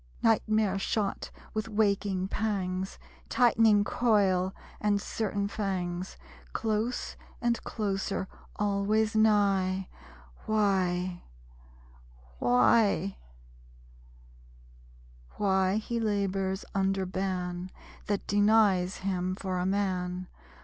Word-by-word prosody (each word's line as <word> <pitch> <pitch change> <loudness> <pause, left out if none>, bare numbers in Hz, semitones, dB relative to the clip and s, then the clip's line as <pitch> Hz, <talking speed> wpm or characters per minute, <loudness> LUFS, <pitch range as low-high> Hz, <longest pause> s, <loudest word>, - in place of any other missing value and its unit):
Nightmare 215 -3 +2
shot 205 0 -1 0.2
with 215 +1 -3
waking 200 -3 +1
pangs; 190 -3 -2 0.3
Tightening 225 -3 +4
coil, 195 -6 +2 0.3
and 205 -1 +2
certain 200 -1 -2
fangs, 185 -3 -3 0.4
Close 220 +3 -1 0.2
and 235 -1 0
closer, 195 -2 -2 0.3
always 210 +2 +1
nigh...... 195 -3 +2 0.6
Why?... 185 -4 +1 1.2
Why? 125 - +3 2.1
Why 190 -1 +2
he 230 +2 -2
labors 195 -3 -1
under 195 -1 +1
ban 185 -1 -3 0.4
That 205 -1 -1
denies 205 -3 +3
him 185 -1 -1
for 185 -2 -3
a 180 - 0
man. 185 -2 -1
195 Hz, 80 wpm, -29 LUFS, 185-215 Hz, 2.1 s, Tightening